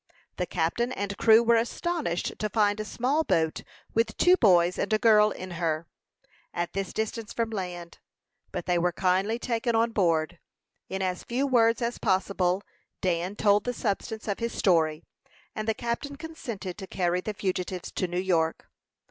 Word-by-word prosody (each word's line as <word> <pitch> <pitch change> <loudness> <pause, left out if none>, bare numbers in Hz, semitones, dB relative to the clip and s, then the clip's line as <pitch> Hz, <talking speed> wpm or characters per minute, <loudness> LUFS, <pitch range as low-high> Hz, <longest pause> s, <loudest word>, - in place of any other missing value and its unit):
The 180 - -1
captain 185 +9 0
and 200 -4 -3
crew 225 +2 +6
were 235 0 +4
astonished 240 - -2
to 215 - -1
find 205 0 +2
a - - -1
small 260 +9 0
boat, 160 - +1 0.3
with 225 -1 0
two 360 +1 +6
boys 180 - +4
and - - -1
a 215 - +4
girl 215 -2 +5
in 185 -2 -7
her, 160 -1 0 0.7
at 175 0 -2
this 195 -1 -3
distance 220 0 -3
from 230 -1 -1
land; 180 -4 -6 0.5
but - - -4
they 175 -1 +2
were 175 +1 +2
kindly 190 +5 +1
taken 235 -1 -1
on 230 +1 +2
board. 170 -4 +1 0.5
In 190 0 -2
as 180 -1 -2
few 255 +4 -1
words 235 -3 +3
as 235 +1 -2
possible 190 -1 +1 0.4
Dan 180 +1 -1
told 205 -1 +3
the 245 - -2
substance 220 0 -3
of 200 - -2
his 230 0 -3
story, 160 -4 +2 0.5
and 215 0 -4
the 220 - +1
captain 240 +5 -3
consented 240 - -7
to 190 - -7
carry 180 -1 0
the 215 +2 -4
fugitives 185 -2 -3
to 185 - -1
New 175 0 -4
York. 165 -4 0
200 Hz, 175 wpm, -27 LUFS, 180-230 Hz, 0.7 s, crew